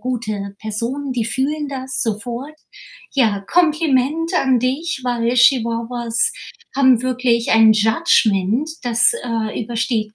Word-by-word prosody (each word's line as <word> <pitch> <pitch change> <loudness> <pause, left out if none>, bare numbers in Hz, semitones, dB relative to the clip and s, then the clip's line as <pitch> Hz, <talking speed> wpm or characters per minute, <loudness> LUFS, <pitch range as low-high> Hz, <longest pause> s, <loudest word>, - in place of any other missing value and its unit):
gute 215 -6 -4
Person, 235 +6 -4
die 235 -3 -2
fühlen 285 +5 -2
das 265 -1 -4
sofort. 240 +7 -5 0.5
Ja, 220 -7 +1
Kompliment 315 -1 +1
an 265 -6 +2
dich, 270 +5 -2
weil 240 -1 0
Chihuahuas 235 - +1 0.4
haben 260 -3 +4
wirklich 250 -2 0
ein 225 -1 +6
Judgement, 220 - +2 0.2
das, 240 - +3
äh, 225 -2 -3
übersteht 220 -1 -2
245 Hz, 110 wpm, -19 LUFS, 225-270 Hz, 0.5 s, ein